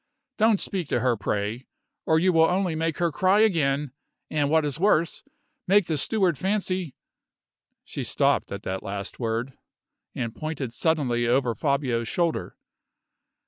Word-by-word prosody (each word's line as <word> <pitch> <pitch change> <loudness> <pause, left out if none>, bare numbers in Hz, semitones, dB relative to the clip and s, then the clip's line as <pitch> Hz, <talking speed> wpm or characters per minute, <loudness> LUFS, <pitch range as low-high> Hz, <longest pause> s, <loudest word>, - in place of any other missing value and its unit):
Don't 220 -2 +4
speak 185 -6 -3
to 120 - 0
her, 125 -1 +2
pray, 105 +4 -3 0.4
or 160 - +4
you 180 +3 +3
will 160 0 +6
only 185 -1 0
make 160 0 -1
her 170 -1 +1
cry 190 +6 +3
again; 150 - +2 0.4
and 145 -2 +1
what 160 0 +3
is 145 +1 -3
worse, 170 -4 +2 0.5
make 200 0 +5
the 160 - -1
steward 180 +1 +1
fancy 185 -5 -1 0.4
" - - -60
She - - -5
stopped - - +1
at - - -6
that 95 0 -3
last 100 0 -6
word, 115 +2 -3 0.6
and 115 -3 -3
pointed 145 -3 -5
suddenly 125 -7 +1
over 125 0 +2
Fabio's 130 -4 0
shoulder. 170 +3 -1
150 Hz, 150 wpm, -25 LUFS, 125-180 Hz, 0.6 s, will